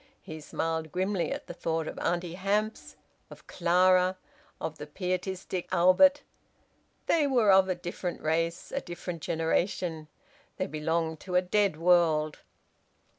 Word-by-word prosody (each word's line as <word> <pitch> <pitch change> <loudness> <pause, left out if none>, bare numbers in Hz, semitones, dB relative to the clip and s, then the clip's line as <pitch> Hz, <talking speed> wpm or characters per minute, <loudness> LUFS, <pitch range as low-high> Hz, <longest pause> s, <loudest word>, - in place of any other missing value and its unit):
He 155 0 -8
smiled 160 +1 -3
grimly 185 0 -1
at - - -4
the - - -8
thought 165 -2 -2
of - - -6
Auntie 175 -1 -1
Hamps, 205 +4 -2 0.3
of - - -14
Clara, 185 +1 +3 0.4
of 155 - -5
the 150 - -7
pietistic 185 +2 -3
Albert! 240 +12 +5 0.8
They 310 -3 +3
were 240 -7 +4
of 190 0 +5
a 185 - +1
different 175 0 -5
race, 165 +2 -1
a 275 - -2
different 175 -1 -7
generation! 165 0 -1 0.5
They - - -1
belonged 160 +1 -2
to 180 -2 -6
a 180 - +5
dead 195 -2 +1
world!) 165 -3 +3
175 Hz, 135 wpm, -29 LUFS, 160-185 Hz, 0.8 s, Albert